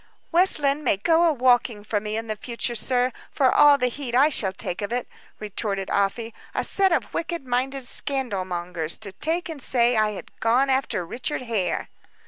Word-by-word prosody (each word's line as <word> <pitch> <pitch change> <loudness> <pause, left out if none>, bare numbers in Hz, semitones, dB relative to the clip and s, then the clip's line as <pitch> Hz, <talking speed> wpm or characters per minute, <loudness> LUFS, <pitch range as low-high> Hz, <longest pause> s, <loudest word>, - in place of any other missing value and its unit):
"West 360 +3 +5
Lynne 285 0 0
may 195 - +2
go 325 - +3
a 330 - +4
walking 245 -5 +2
for 210 0 -1
me 210 +1 -4
in 225 0 -5
future, 235 +2 -3
sir, 250 +2 0 0.2
for 265 -2 +2
all 290 -1 +6
the 250 - 0
heed 250 0 -3
I 280 +4 +5
shall 205 -10 -1
take 180 0 -4
of 205 - -4
it," 245 0 -2 0.3
retorted 205 -2 -3
Afy. 215 +3 -1 0.2
"A - - 0
set 385 -1 +2
of 260 -11 -1
wicked 335 -3 -3
minded 260 +2 -1
scandal 250 -8 +1
mongers, 175 -3 -3
to 205 -3 -5
take 325 - -1
and 315 -4 -6
say 240 -1 +2
I 215 -1 +2
had - - -11
gone 250 +4 +2
after 260 -9 0
Richard 255 - -3
Hare!" 210 -8 -2
245 Hz, 190 wpm, -24 LUFS, 210-275 Hz, 0.3 s, all